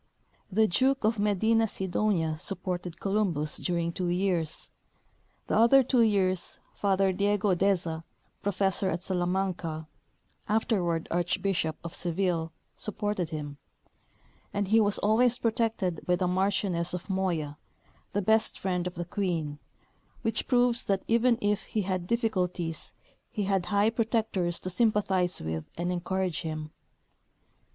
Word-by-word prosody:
The 220 Hz, +3 st, +4 dB
Duke 265 Hz, +7 st, +2 dB
of 220 Hz, 0 st, +2 dB
Medinasidonia 205 Hz, -5 st, +1 dB
supported 180 Hz, -2 st, -4 dB
Columbus 190 Hz, -7 st, 0 dB
during 170 Hz, -1 st, -1 dB
two 180 Hz, -1 st, -2 dB
years; 175 Hz, -3 st, -1 dB, 0.7 s
the -, -, -1 dB
other 235 Hz, +5 st, +6 dB
two 250 Hz, 0 st, +3 dB
years 190 Hz, -5 st, +1 dB, 0.2 s
Father 195 Hz, -1 st, +2 dB
Diego 205 Hz, 0 st, +2 dB
Deza, 175 Hz, -3 st, +1 dB, 0.4 s
professor 195 Hz, -1 st, 0 dB
at 175 Hz, +1 st, -3 dB
Salamanca, 180 Hz, -3 st, -1 dB, 0.6 s
afterward 185 Hz, -6 st, +1 dB
Archbishop 175 Hz, -1 st, 0 dB
of 170 Hz, 0 st, -6 dB
Seville, 175 Hz, -2 st, -1 dB, 0.2 s
supported 205 Hz, -5 st, -3 dB
him; 145 Hz, -2 st, -6 dB, 0.9 s
and 200 Hz, -1 st, -1 dB
he 225 Hz, +2 st, +6 dB
was 205 Hz, -1 st, +3 dB
always 235 Hz, +4 st, +3 dB
protected 225 Hz, -7 st, 0 dB
by 180 Hz, -, +4 dB
the 180 Hz, 0 st, 0 dB
Marchioness 180 Hz, -2 st, 0 dB
of 180 Hz, -, -7 dB
Moya, 175 Hz, -7 st, -1 dB, 0.5 s
the 205 Hz, -, 0 dB
best 220 Hz, +3 st, +2 dB
friend 180 Hz, -2 st, -1 dB
of 180 Hz, -, -6 dB
the 175 Hz, 0 st, -4 dB
Queen, 170 Hz, -6 st, -2 dB, 0.6 s
which 225 Hz, -1 st, 0 dB
proves 245 Hz, -1 st, +3 dB
that 195 Hz, -1 st, 0 dB
even 235 Hz, +1 st, +3 dB
if 205 Hz, 0 st, +2 dB
he 215 Hz, -, -1 dB
had 185 Hz, -2 st, -2 dB
difficulties 180 Hz, -8 st, -1 dB, 0.4 s
he 210 Hz, -, -2 dB
had 190 Hz, -2 st, 0 dB
high 205 Hz, +3 st, +3 dB
protectors 220 Hz, -6 st, 0 dB
to 185 Hz, -, -3 dB
sympathize 195 Hz, -4 st, +2 dB
with 80 Hz, 0 st, -4 dB
and 175 Hz, +1 st, -1 dB
encourage 180 Hz, -1 st, -1 dB
him. 155 Hz, -1 st, -5 dB
190 Hz, 130 wpm, -28 LUFS, 175-210 Hz, 0.9 s, other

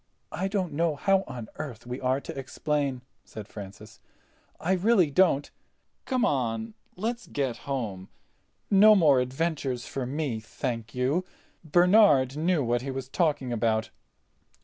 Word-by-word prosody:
"I 185 Hz, +4 st, -2 dB
don't 195 Hz, -3 st, -2 dB
know 165 Hz, 0 st, +1 dB
how 195 Hz, +5 st, +2 dB
on 120 Hz, -3 st, -7 dB
earth 120 Hz, -7 st, -7 dB
we 125 Hz, +2 st, -6 dB
are 130 Hz, +1 st, +1 dB
to -, -, -8 dB
explain," 135 Hz, -1 st, -2 dB, 0.2 s
said 105 Hz, -2 st, -9 dB
Francis. 105 Hz, +1 st, -11 dB, 0.6 s
"I 175 Hz, -, -1 dB
really 190 Hz, -3 st, +3 dB
don't. 160 Hz, -4 st, +3 dB, 0.5 s
Come 255 Hz, -3 st, +1 dB
on—let's 125 Hz, -, -3 dB
get 130 Hz, -5 st, -2 dB
home. 105 Hz, -9 st, -3 dB, 0.6 s
No 210 Hz, +2 st, +8 dB
more 150 Hz, -9 st, +5 dB
adventures 135 Hz, -1 st, -2 dB
for 130 Hz, -2 st, -4 dB
me, 140 Hz, -4 st, -2 dB
thank 115 Hz, 0 st, -5 dB
you. 135 Hz, +8 st, +1 dB, 0.4 s
Bernard 160 Hz, -, +5 dB
knew 160 Hz, 0 st, +1 dB
what 120 Hz, 0 st, 0 dB
he 135 Hz, -, -5 dB
was 135 Hz, -1 st, -5 dB
talking 145 Hz, -6 st, 0 dB
about." 110 Hz, -1 st, 0 dB
135 Hz, 135 wpm, -27 LUFS, 120-170 Hz, 0.6 s, No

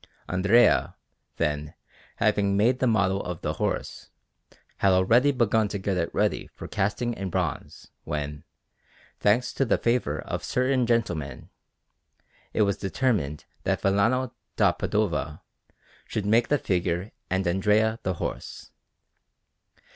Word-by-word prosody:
Andrea, 100 Hz, +6 st, +3 dB, 0.4 s
then, 75 Hz, 0 st, -2 dB, 0.4 s
having 100 Hz, -1 st, +2 dB
made 120 Hz, +5 st, +3 dB
the 130 Hz, -, +2 dB
model 100 Hz, -4 st, +2 dB
of 90 Hz, -2 st, -5 dB
the -, -, -2 dB
horse, -, -, -3 dB, 0.7 s
had 95 Hz, -1 st, +3 dB
already 115 Hz, +10 st, +4 dB
begun 110 Hz, -4 st, +2 dB
to 100 Hz, -, -4 dB
get 95 Hz, 0 st, -2 dB
it 85 Hz, -2 st, -1 dB
ready -, -, 0 dB
for -, -, -8 dB
casting 120 Hz, +5 st, -1 dB
in 95 Hz, -3 st, -4 dB
bronze, -, -, -4 dB
when, 75 Hz, 0 st, -4 dB, 0.8 s
thanks 110 Hz, +5 st, +2 dB
to -, -, +1 dB
the 125 Hz, -, +2 dB
favour 115 Hz, -11 st, 0 dB
of -, -, -5 dB
certain 130 Hz, -1 st, +1 dB
gentlemen, 85 Hz, -, -1 dB, 1.0 s
it 110 Hz, -, +2 dB
was 100 Hz, -1 st, +1 dB
determined 95 Hz, -, -1 dB, 0.2 s
that -, -, -1 dB
Vellano 115 Hz, +6 st, +2 dB, 0.2 s
da 100 Hz, -4 st, +4 dB
Padova 85 Hz, -3 st, -1 dB, 0.7 s
should 105 Hz, -, -3 dB
make 115 Hz, +3 st, +3 dB
the 145 Hz, -, +2 dB
figure 90 Hz, -2 st, -1 dB, 0.2 s
and 95 Hz, +1 st, 0 dB
Andrea 105 Hz, +5 st, +2 dB
the 95 Hz, -, -2 dB
horse. -, -, -6 dB
100 Hz, 130 wpm, -26 LUFS, 90-115 Hz, 1.0 s, already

